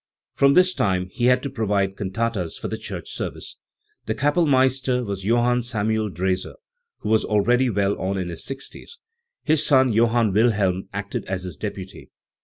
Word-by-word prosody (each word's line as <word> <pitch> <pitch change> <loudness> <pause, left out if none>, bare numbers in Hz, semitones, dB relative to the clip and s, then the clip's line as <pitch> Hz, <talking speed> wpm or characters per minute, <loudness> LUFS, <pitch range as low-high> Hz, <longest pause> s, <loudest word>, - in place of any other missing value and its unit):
From 140 0 +4
this 185 0 +5
time 90 - 0
he 120 - -1
had 125 0 +4
to 140 - -3
provide 100 -5 0
cantatas 100 -3 -3
for - - -5
the - - -4
church - - -7
service. - - -6 0.5
The 110 - -1
Kapellmeister 130 -3 +2
was 100 -2 -5
Johann 120 +2 +2
Samuel 110 -2 -1
Drese, 95 0 -1 0.5
who - - -4
was 110 0 +3
already 120 +5 +2
well 100 -2 +1
on 95 +1 -2
in 90 -2 -3
his 85 - -6
sixties; 135 - -7 0.5
his 155 -1 +2
son 130 -5 +4
Johann 115 -1 +2
Wilhelm 105 -4 +1
acted 100 0 -4
as 95 -1 -3
his 90 -4 -6
deputy. 100 +1 -7
110 Hz, 165 wpm, -23 LUFS, 95-125 Hz, 0.5 s, this